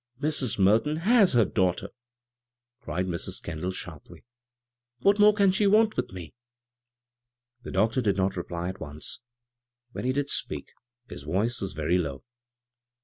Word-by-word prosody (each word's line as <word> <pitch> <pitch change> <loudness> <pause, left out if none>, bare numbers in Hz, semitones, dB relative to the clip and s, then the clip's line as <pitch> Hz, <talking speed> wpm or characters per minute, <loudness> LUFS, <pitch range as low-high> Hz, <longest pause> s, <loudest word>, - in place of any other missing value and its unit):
"Mrs. 145 -6 +1
Merton 110 +11 +3
Aeis 220 -4 +5
her 115 -3 +5
daughto*," 90 -2 0 0.9
cried 90 -5 -3
Mrs, 85 -2 -3
Kendall, 85 +2 -4
sharply. 90 -4 -8 0.4
" 120 0 -61
What 200 +1 +4
more 210 0 +8
can 200 -2 +3
she 200 +2 +2
want 215 +2 +4
with - - -2
me?" 90 -4 -9 1.3
The - - -8
doctor 115 +4 +1
did 100 -4 +1
not 95 0 0
reply 85 0 -4
at 95 0 -7
once. 75 0 -6 0.7
When - - -6
he 130 - +2
did 140 +1 -1
speak - - -2 0.4
his - - -8
voice 100 +11 -1
was 95 - -3
very 80 +4 +1
low. 70 -6 -4
105 Hz, 150 wpm, -27 LUFS, 90-145 Hz, 1.3 s, more